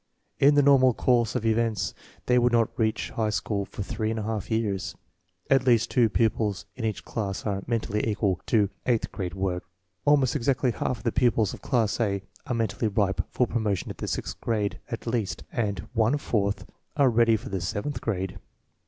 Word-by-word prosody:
In 145 +1 +6
the 145 - +5
normal 130 -3 +5
course 120 -3 +2
of 110 - -1
events 115 -2 +1 0.3
they 125 0 +4
will 120 0 +4
not 115 -2 +2
reach 110 -2 0
high 110 -2 0
school 100 +1 -1
for 100 - -6
three 110 +2 -2
and 115 - -2
a 110 - -2
half 110 -2 -3
years. 105 -4 -1 0.5
At 135 -2 +4
least 120 -4 +3
two 120 -3 +4
pupils 105 -3 0
in 120 - -4
each 110 -2 -3
class 100 -4 -3
are 100 -2 -1
mentally 110 -2 -1
equal 100 -4 0
to 105 -4 +3 0.2
eighth 120 -3 +1
grade 90 -2 -4
work. 95 -2 -1 0.4
Almost 145 -3 +3
exactly 130 -1 +1
half 120 +2 -2
of 105 - -14
the 115 - +1
pupils 120 -5 +2
of - - -9
class 115 -5 +1
A 100 -4 0 0.2
are 125 - -1
men 115 -1 +1
tally 115 - -1
ripe 100 -2 +1
for 125 - +1
promotion 110 -6 -1
to - - -4
the - - -5
sixth - - -4
grade, 105 -3 -1
at 115 - -5
least, 115 -6 -2
and 100 -6 -2
one 115 +4 +3
fourth 100 -7 -1 0.3
are 140 -3 +5
ready 115 -1 +4
for 110 - -9
the 95 -2 -2
seventh 115 +9 -3
grade. 95 -4 -3
110 Hz, 195 wpm, -26 LUFS, 100-120 Hz, 0.5 s, In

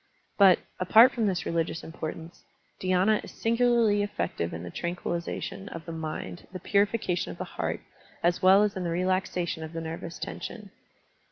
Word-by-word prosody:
But, 190 -3 +8 0.2
apart 225 +8 +7
from 230 -4 0
this 180 -4 -1
religious 165 0 -1
importance, 160 +1 -7 0.4
dhy^na 185 +3 +2
is - - -9
sin 225 +1 +1
gularly 235 -4 +4
effective 85 - -2
in 85 +1 -6
the 90 - -7
tranquillization 170 - -4
of 165 -4 -8
the 165 - -6
mind, 160 +1 -5
the 185 - -6
purification 200 -2 +1
of - - -9
the - - -3
heart, - - -3 0.4
as 175 +1 +2
well 190 +2 +7
as 210 -1 0
in 185 - -3
the 170 - -1
relaxation 180 -1 -1
of 160 +1 -7
the 165 - -4
nervous 165 +1 -6
tension. 210 -4 -7
180 Hz, 170 wpm, -28 LUFS, 165-205 Hz, 0.4 s, But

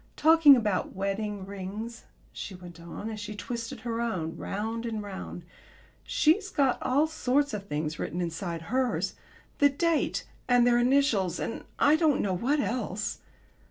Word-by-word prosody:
Talking 315 -2 +8
about 210 -7 -1
wedding 200 +1 -2
rings," 200 +4 -6 0.3
she 195 - -6
went 175 -2 -11
on, 170 +5 -7
as 220 -1 -5
she 210 +1 -6
twisted 230 +3 -5
her 235 -1 -2
own 180 -9 -2
round 225 +3 -3
and 220 -3 -3
round, 190 -3 -7 0.6
"she's 375 +6 +2
got 270 -3 +1
all 275 +4 +3
sorts 285 -2 0
of 200 -1 -5
things 150 0 -3
written 175 - -3
inside 170 -1 -3
hers 260 -1 +1 0.5
the 285 - +6
date 330 +3 0 0.2
and 245 -1 +5
their 240 0 +4
initials 240 - +2
and - - -4
I 295 +2 +5
don't 315 -3 +3
know 195 - 0
what 260 +11 +1
else." 220 -6 -2
225 Hz, 155 wpm, -28 LUFS, 190-265 Hz, 0.6 s, Talking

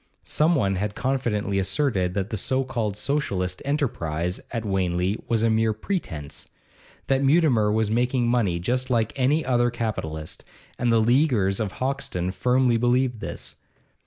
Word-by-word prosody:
Some 160 +3 +2
one 95 - +1
had 105 +2 -2
confidently 115 -7 -1
asserted 95 -4 0
that 100 +3 -2
the - - -1
so 130 +6 0
called 115 -6 -3
Socialistic 100 -6 -2
enterprise 90 - -1
at 115 -2 -4
Wanley 95 0 0
was 115 -1 +1
a 115 - +3
mere 110 0 +2
pretence, 100 - -5 0.6
that 135 0 +1
Mutimer 135 -8 +4
was 110 0 +1
making 120 +1 +1
money 115 -8 +1
just 125 +9 -1
like 115 -3 +1
any 140 +4 +2
other 120 -1 +2
capitalist, 100 -10 -4 0.4
and 120 -1 +2
the 115 - +4
leaguers 115 -5 +2
of 105 -4 -2
Hoxton 130 -9 -2
firmly 125 +4 +2
believed 120 0 +1
this. - - -7
115 Hz, 150 wpm, -24 LUFS, 95-130 Hz, 0.6 s, Mutimer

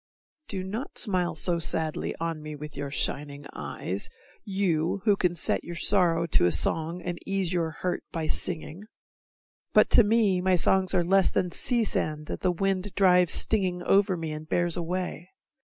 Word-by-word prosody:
Do 190 -2 -2
not 215 +9 -6
smile 185 -6 +2
So 170 +2 +2
sadly 160 -1 0
on 165 -1 -3
me 155 0 -7
with 150 0 -9
your 140 0 -5
shining 145 0 -3
eyes, 75 +7 -5 0.3
You 190 -3 -1
who 205 -2 +4
can 180 -3 0
set 160 - 0
your 175 - -7
sorrow 170 -2 +2
to 165 - +3
a - - +1
song 165 - +1
And 175 -1 -4
ease 195 -2 -1
your 170 -2 0
hurt 180 +3 -4
by 165 -2 -3
singing. 170 +3 -1 0.9
But - - +4
to 235 - +7
me 205 -4 +2
My 185 0 +2
songs 185 +2 +2
are 175 - +3
less 190 +2 +3
than 180 - -1
sea 240 +4 +1
sand 155 -7 -2
that - - -6
the 185 - +2
wind 195 +2 -2
Drives 180 -3 +4
stinging 185 -5 0
over 195 -1 +2
me 165 -1 -5
and 155 +1 -8
bears 175 -1 +1
away. 175 0 -4
175 Hz, 175 wpm, -26 LUFS, 160-190 Hz, 0.9 s, to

